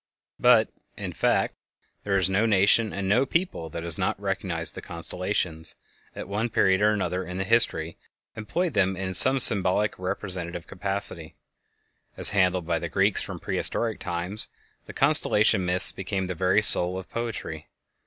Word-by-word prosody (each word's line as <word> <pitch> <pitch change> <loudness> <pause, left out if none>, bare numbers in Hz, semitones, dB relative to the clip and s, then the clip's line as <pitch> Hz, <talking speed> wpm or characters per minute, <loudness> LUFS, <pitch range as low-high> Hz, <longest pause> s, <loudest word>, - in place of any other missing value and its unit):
But, - - +2 0.3
in - - -8
fact, - - -2 0.5
there 100 -1 -1
is 95 - 0
no 100 +4 -1
nation 105 +2 +2
and 100 -1 -6
no 105 +7 +1
people 150 - -4
that 85 +2 -9
has 85 -2 +1
not - - -3
recognized - - -1
the - - -10
constellations, 85 -1 -4 0.4
and - - -8
at - - -10
one 105 +4 -4
period 95 -3 0
or 105 - +2
another 95 -3 -4
in 90 +1 -9
its 95 +3 -6
history 85 -9 +1 0.4
employed 160 +10 -5
them 95 -3 -1
in 95 0 -6
some 130 +8 +8
symbolic 105 -4 +3
or 90 - -7
representative 90 -3 -3
capacity. 95 -4 -5 0.8
As - - +7
handled 90 -3 -1
by 85 -1 -3
the 85 0 -7
Greeks 95 +3 0
from - - -8
prehistoric 115 -2 -3
times, 90 +5 -6 0.4
the - - -11
constellation 95 -3 +4
myths 90 +1 +8
became 95 0 -6
the 90 - -6
very 95 +4 -1
soul 90 -3 +5
of 95 - -10
poetry. 115 -10 -8
95 Hz, 165 wpm, -23 LUFS, 90-105 Hz, 0.8 s, some